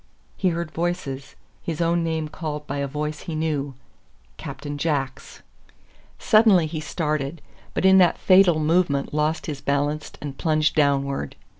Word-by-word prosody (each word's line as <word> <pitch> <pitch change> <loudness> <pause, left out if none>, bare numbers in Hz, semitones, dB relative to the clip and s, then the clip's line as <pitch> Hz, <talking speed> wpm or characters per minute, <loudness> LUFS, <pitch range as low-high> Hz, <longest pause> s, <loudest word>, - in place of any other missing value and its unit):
He 190 - +1
heard 170 -2 -3
voices, 165 -6 -3 0.3
his 165 -2 -4
own 170 0 +1
name 160 -1 -1
called 150 -1 -5
by 140 - -4
a 140 - -1
voice 150 +2 -4
he 165 - -6
knew 150 -4 -2 0.6
Captain 145 0 -7
Jack's! 140 -4 -3 0.7
Suddenly 215 -6 +5
he 155 0 -4
started, 155 -1 -2 0.4
but - - 0
in 190 0 +7
that 175 -2 +4
fatal 185 -4 +5
movement 155 -3 +1
lost 155 +1 0
his 145 -3 -5
balance 145 +2 -1
and 140 -2 -7
plunged 155 -2 +2
downward. 140 - +1
155 Hz, 145 wpm, -23 LUFS, 145-170 Hz, 0.7 s, in